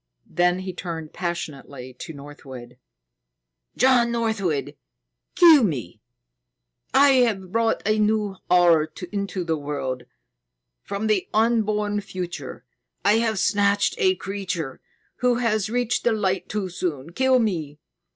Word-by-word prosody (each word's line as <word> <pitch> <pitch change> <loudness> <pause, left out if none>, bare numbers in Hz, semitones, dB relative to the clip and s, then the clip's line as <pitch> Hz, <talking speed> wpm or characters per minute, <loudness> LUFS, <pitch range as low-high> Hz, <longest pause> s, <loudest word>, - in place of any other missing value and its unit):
Then 180 +1 +1
he 185 -1 -5
turned 165 -3 -6
passionately 140 -7 -5
to 170 - -7
Northwood. 135 -4 -11 1.0
"John 245 -2 +4
Northwood, 220 -10 -1 0.6
kill 325 -6 +7
me! 120 - -3 0.9
I 280 +1 +6 0.2
have 190 -5 -4
brought 230 +1 +1
a 215 +1 +2
new 210 -2 +1
horror 170 -3 +4 0.2
into 200 -2 -3
the 165 -2 -1
world. 135 -4 -4 0.8
From 200 +2 -4
the 215 -4 0
unborn 215 -2 +1
future, 175 -9 -7 0.4
I 205 +2 +5
have 225 -2 0
snatched 200 +1 +2
a 380 -3 +3
creature 185 - -5 0.4
who 250 -1 +2
has 215 -4 0
reached 245 0 0
the 235 - +2
Light 190 -4 -1
too 205 -3 -3
soon. 165 -4 -4
Kill 260 +4 +3
me!" 165 - -1
195 Hz, 120 wpm, -23 LUFS, 160-220 Hz, 1.0 s, kill